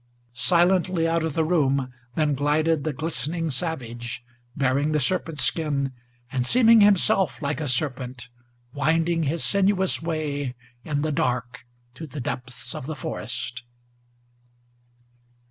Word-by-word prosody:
Silently 175 +3 +2
out 165 0 +1
of 160 -3 -2
the 160 - +2
room 140 -6 +1 0.2
then 150 -2 +2
glided 150 +2 +1
the 155 - -1
glistening 160 +2 -2
savage, 120 -7 -4 0.3
Bearing 140 +3 +1
the 150 - +2
serpent's 165 -3 0
skin, 145 -4 0 0.4
and 130 -2 0
seeming 230 - +6
himself 195 - +3
like 150 +1 -2
a 150 - -2
serpent, 125 -2 -1 0.5
Winding 165 +4 +1
his 160 +2 0
sinuous 195 -2 +2
way 145 -5 -2 0.3
in 145 -1 -1
the 155 - 0
dark 125 -2 -2 0.3
to 160 +5 -8
the 145 +1 -7
depths 125 0 -4
of 130 - -6
the 155 - -4
forest. 125 0 -4
150 Hz, 130 wpm, -25 LUFS, 130-165 Hz, 0.5 s, seeming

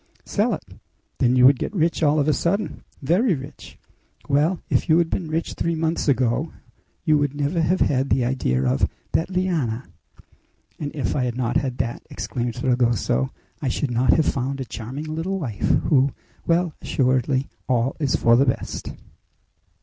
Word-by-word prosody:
"Sell - - +1
it!" - - -11 0.6
"Then 125 0 +3
you 125 0 +6
would 135 0 +6
get - - -4
rich 170 -1 +1
all 150 0 +3
of 145 - +1
a 155 - +4
sudden!" 200 +8 -1 0.2
"Very 185 - +3
rich!" 135 +1 -10 0.5
"Well, 150 +5 +2
if - - 0
you 160 - +6
had 170 -1 +1
been 175 - -2
rich 160 +2 -2
three 170 0 -1
months 160 0 -1
ago 130 +3 +1 0.5
you 155 -2 +4
would 145 -1 -1
never 145 +4 0
have 180 +4 +1
had 135 -1 +2
the 125 -2 +2
idea 115 - 0
of 65 +2 +2 0.2
that 165 - 0
liana!" 165 -11 -1 0.9
"And 145 - -3
if 125 -10 -1
I 130 - +1
had 120 -1 -3
not 120 -2 +1
had 130 -2 -2
that," 120 -2 -2
exclaimed 120 -2 -3
Fragoso, 120 - +1 0.3
"I 140 - -1
should 130 +1 -1
not 120 +2 +3
have 160 - +3
found 135 +1 -1
a 130 - -3
charming 125 +7 -6
little 165 +5 -3
wife 115 - -5
who 140 -3 +3 0.4
well, 170 -1 +2
assuredly, 130 +1 +1 0.2
all 125 +1 +1
is 145 -4 +1
for 115 0 +4
the 135 +3 +4
best!" 125 - -2
140 Hz, 175 wpm, -23 LUFS, 125-160 Hz, 0.9 s, you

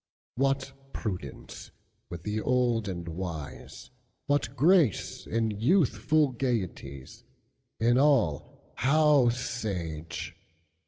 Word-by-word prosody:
What 135 +1 0 0.2
prudence 90 - -6 0.4
with 85 -1 -7
the 105 +1 -2
old 120 -4 +1
and 85 -3 -5
wise:What 85 - -5
grace 155 - +2
in 115 -1 0
youthful 140 - +2
gayeties; 95 - -4 0.6
In 120 +3 +3
all 125 - +1
how 145 -1 +4
sage! 95 -10 -4
115 Hz, 85 wpm, -28 LUFS, 90-135 Hz, 0.6 s, how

